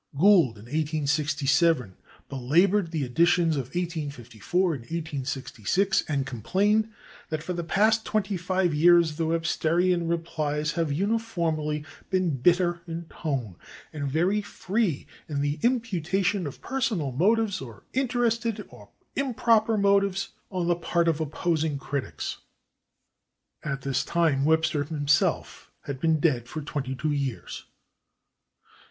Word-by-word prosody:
Gould, 170 - +5
in 105 - -12
1867, 150 - +1 0.3
belabored 170 +9 +2
the 160 -3 -2
editions 165 +4 +3
of 135 -3 -2
1854 160 - -2
and 135 - -5
1866, 145 - -1
and 140 -3 -1
complained 205 - +1 0.4
that 155 -1 -3
"for 180 - -3
the 170 -1 -3
past 215 +6 +2
twenty 205 -2 -1
five 180 -1 0
years 165 0 +5
the 165 - 0
Websterian 165 +1 +1
replies 155 -3 -1
have 165 -3 -1
uniformly 165 -6 -1 0.2
been 185 -7 +1
bitter 175 +5 +2
in 165 +1 -5
tone, 130 - -4 0.4
and 145 -2 -3
very 180 +9 +1
free 205 - -2 0.2
in 145 -2 -1
the 145 +1 -1
imputation 200 - 0
of 140 - -9
personal 220 - -1
motives, 200 - +2
or 115 -6 -10
interested 235 -4 0
or - - -15 0.3
improper 230 -4 +2
motives, 200 -1 +2 0.2
on 185 -3 -2
the 175 0 +2
part 170 0 0
of 160 -1 +1
opposing 155 0 -1
critics." 140 0 -4 1.2
At 135 -3 -3
this 135 -1 0
time 155 -5 +1
Webster 160 -1 +2
himself 145 -1 0
had 140 -2 -6
been 160 +1 +2
dead 130 -7 +1
for 155 - -5
twenty 140 -3 -4
two 150 +4 -1
years. 140 -4 -4
165 Hz, 125 wpm, -26 LUFS, 145-190 Hz, 1.2 s, Gould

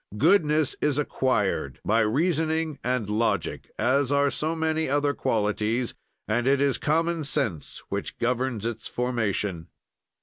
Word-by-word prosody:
"Goodness 155 - +3
is 150 -2 +1
acquired 130 -8 0
by 110 +2 +3
reasoning 160 +5 +1
and 125 -3 0
logic, 110 +3 -1
as 130 +3 +2
are 140 0 +3
so 155 +5 -1
many 160 -2 0
other 145 +1 +2
qualities, 110 +1 0 0.3
and 120 +1 0
it 140 0 +4
is 140 -1 +2
common 165 +2 +1
sense 100 - -2
which - - -4
governs 125 -2 -1
its 115 -1 -4
formation. 105 -8 -1
130 Hz, 130 wpm, -26 LUFS, 115-150 Hz, 0.3 s, it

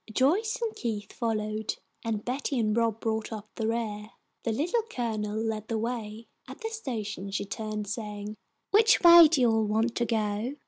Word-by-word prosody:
Joyce 345 - +2
and 445 -2 -2
Keith 215 -4 -4
followed, 215 -2 -2 0.3
and 220 -2 -2
Betty 270 +2 -2
and 215 -2 +1
Rob 230 -2 +1
brought 220 -1 -2
up 215 -1 -7
the 220 - -2
rear. 215 -2 -2 0.3
The 230 - -1
Little 335 - +1
Colonel 215 - -2
led 220 -1 -2
the 225 - -1
way. 225 -1 -4 0.2
At - - -10
the 445 - -3
station 215 - -5
she 200 +1 -2
turned, 215 0 -4
saying, 210 0 -5 0.4
"Which 440 +2 +6
way 340 -1 +10
do 300 -3 +1
you 240 -2 +5
all 220 -1 +2
want 220 +3 +1
to 240 - +1
go?" 220 +3 -1
225 Hz, 180 wpm, -28 LUFS, 215-245 Hz, 0.4 s, way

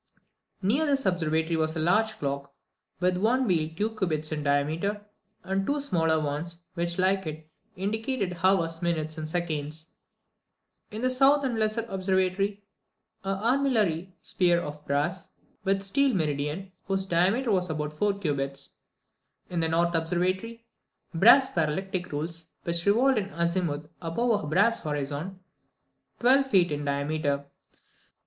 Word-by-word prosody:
Near 265 +11 +2
this 275 -2 +1
observatory 160 -2 +1
was 160 0 0
a - - -2
large 215 +7 +2
clock, 140 0 -4 0.4
with 180 0 +2
one 240 +7 +2
wheel 165 -7 +1
two 215 +4 -1
cubits 155 -7 -1
in 155 -1 -2
diameter, 155 +9 0 0.4
and 195 +1 -1
two 285 +8 0
smaller 165 - +1
ones, 155 +4 -4
which, 170 -1 -2
like 190 -1 +1
it, 155 0 -7 0.3
indicated 205 0 -2
hours, 165 -4 +2
minutes, 160 -2 -1
and 155 0 -4
seconds. 155 -2 -3 1.0
In 215 +3 -6
the 255 - +2
south 275 +3 +4
and 245 -4 -1
lesser 215 +1 0
Observatory. 190 +1 0 0.6
8. - - -20
An 195 0 -1
armillary 215 - +1
sphere 175 -2 +2
of 150 -2 -7
brass, 150 +6 -1 0.3
with 195 0 +1
a - - -9
steel 270 +4 +2
meridian, 150 +3 -2 0.2
whose 195 0 0
diameter 195 +8 +2
was 180 -2 +1
about 150 -1 -3
4 200 +5 0
cubits. 140 -6 -3 0.7
In 175 - -1
the 165 -1 +1
north 170 +1 +2
Observatory. 185 +8 -1 0.5
9. 165 - -3
Brass 255 +7 +8
parallactic 180 +3 -1
rules, 160 +2 -4 0.2
which 170 +2 0
revolved 240 +4 +4
in 195 -1 -4
azimuth 170 -3 -1
above 205 +6 0
a - - -5
brass 200 +9 +3
horizon, 150 +5 -4 0.8
twelve 270 +3 +4
feet 185 -9 +3
in 145 0 -2
diameter. 140 0 -1
180 Hz, 145 wpm, -27 LUFS, 155-205 Hz, 1.0 s, Brass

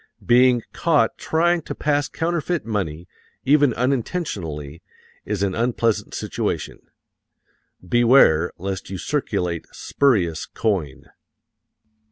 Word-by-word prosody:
Being 125 -1 +4
caught 160 -3 +2
trying 170 +2 +1
to - - -7
pass 145 -1 0
counterfeit 170 +1 -2
money, 90 -7 -3 0.4
even 145 0 +4
unintentionally, 105 - -3 0.4
is 100 -2 -2
an 95 -1 0
unpleasant 115 -1 0
situation. - - -3 1.1
Beware 115 - +4
lest 95 +1 -5
you 95 - -5
circulate 95 - -2
spurious 95 - 0
coin. 90 -11 -3
115 Hz, 95 wpm, -22 LUFS, 90-145 Hz, 1.1 s, Being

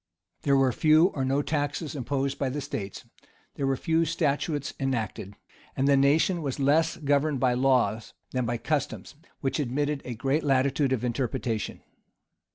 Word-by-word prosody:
There 140 -1 +3
were 135 -1 +3
few 155 +7 +4
or 135 - -3
no 135 +2 +1
taxes 145 +1 -2
imposed 140 +1 -2
by 135 - 0
the 140 +3 -3
states; 105 -8 -6 0.5
there 135 - -2
were 135 -1 +1
few 165 +4 +1
statutes 150 -2 -1
enacted; 115 -7 -3 0.4
and 135 - +2
the 140 - +5
nation 155 +6 +3
was 140 -2 -3
less 155 +4 +2
governed 145 -1 +1
by 125 -1 +3
laws, 125 -3 +1 0.2
than 125 -2 -1
by 120 +1 -1
customs, 150 +4 -3 0.3
which 135 +2 -1
admitted 145 +2 -1
a 125 - -5
great 135 +7 0
latitude 135 0 +2
of 125 -3 0
interpretation. 120 -3 -2
140 Hz, 160 wpm, -27 LUFS, 130-145 Hz, 0.5 s, the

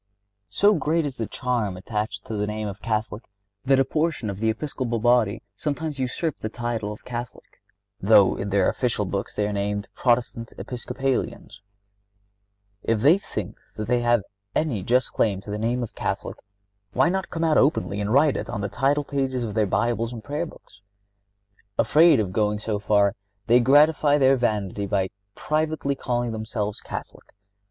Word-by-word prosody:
So 205 - +4
great 160 -2 +1
is 135 -2 -4
the 115 - -2
charm 115 -7 -2
attached 105 +1 -4
to - - -6
the 105 0 -1
name 105 0 -3
of 100 0 -7
Catholic 110 0 -2 0.4
that 135 0 +4
a 135 - +4
portion 155 -6 -1
of 100 - -8
the 110 +1 +1
Episcopal 120 0 -2
body 120 -2 +2
sometimes 150 +3 -3
usurp 130 +4 -2
the 110 - -4
title 115 -3 -3
of 105 - -10
Catholic, 120 0 -7 0.4
though - - +5
in 100 - -4
their 100 -1 +3
official 120 -5 0
books 100 +1 -3
they 105 -1 0
are 105 - -3
named 100 0 -2
Protestant 120 -2 0
Episcopalians. 125 -3 -3 1.2
If 110 -1 0
they 155 - +6
think - - -6 0.2
that 105 -1 -4
they 125 - +2
have 120 -3 +2 0.3
any 140 -11 0
just 125 +6 +1
claim 100 -4 +1
to 100 - -8
the 105 - -3
name 120 +3 0
of 115 - -7
Catholic, - - -3 0.6
why 130 - +4
not 190 +1 -2
come 165 - -3
out 160 -2 +4
openly 130 -8 +1
and 105 +1 -2
write 140 +3 +4
it - - -5
on 105 -4 -3
the 100 - -2
title 135 +8 +1
pages 135 -3 -1
of 110 -3 -4
their 110 -1 +2
Bibles 115 +2 0
and 115 -3 -8
Prayer 150 +8 -3
Books? 100 - -17 1.0
Afraid 155 +6 +5
of 95 -4 -1
going 105 0 +1
so 105 -1 -2
far, 100 -1 +3 0.3
they 120 +2 +5
gratify 145 +3 +5
their 135 -1 +5
vanity 105 -5 -1
by 95 -1 0 0.2
privately 155 -2 -1
calling 120 -3 -2
themselves 110 -1 -3
Catholic. - - -8
120 Hz, 175 wpm, -24 LUFS, 105-135 Hz, 1.2 s, they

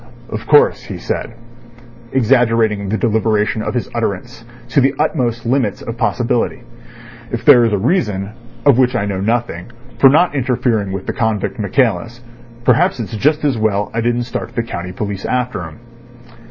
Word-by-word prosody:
"Of 110 0 -5
course," 150 -1 +4
he - - -6
said, 115 - -4 0.8
exaggerating 115 -5 +2
the 110 - 0
deliberation 110 -1 +1
of 115 - -3
his 120 - -1
utterance 115 +1 -3 0.3
to 140 - +3
the 135 +1 +2
utmost 120 -6 -1
limits 120 -4 0
of 115 - -5
possibility, 120 +1 -1 0.7
"if 120 - -4
there 120 - +8
is 115 - +1
a 105 - +1
reason, 105 - 0 0.3
of 140 -3 +5
which 125 -1 +3
I 105 - 0
know 100 -2 -3
nothing, 115 -3 -2 0.3
for 135 - +8
not 160 +4 +3
interfering 120 -6 0
with 95 -1 -5
the - - -3
convict 110 -3 -1
Michaelis, 115 +1 0 0.4
perhaps 125 +1 +3
it's 115 0 -5
just 150 +7 +1
as 135 -6 +1
well 105 -2 0
I 115 - -1
didn't 120 +1 0
start 120 - -6
the 115 - 0
county 90 -5 -6
police 100 0 -5
after 125 -5 -2
him." 80 - -11
115 Hz, 165 wpm, -17 LUFS, 105-125 Hz, 0.8 s, there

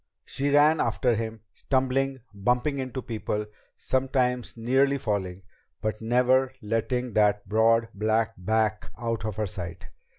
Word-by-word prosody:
She 140 +1 -2
ran 150 +2 +5
after 125 -2 +1
him, 110 -1 -4
stumbling, 135 0 0
bumping 125 +8 0
into 130 -1 -4
people, 105 -2 -3 0.3
sometimes 130 -2 0
nearly 135 +4 +2
falling, 95 -7 -3 0.4
but 110 0 -3
never 125 +3 +3
letting 120 +2 -1
that 105 -1 +2
broad, 115 +2 +3
black 110 +2 +1
back 110 +3 0
out 115 -2 -3
of 110 -3 -3
her 110 0 -1
sight. 85 -3 -7
115 Hz, 130 wpm, -26 LUFS, 110-130 Hz, 0.4 s, ran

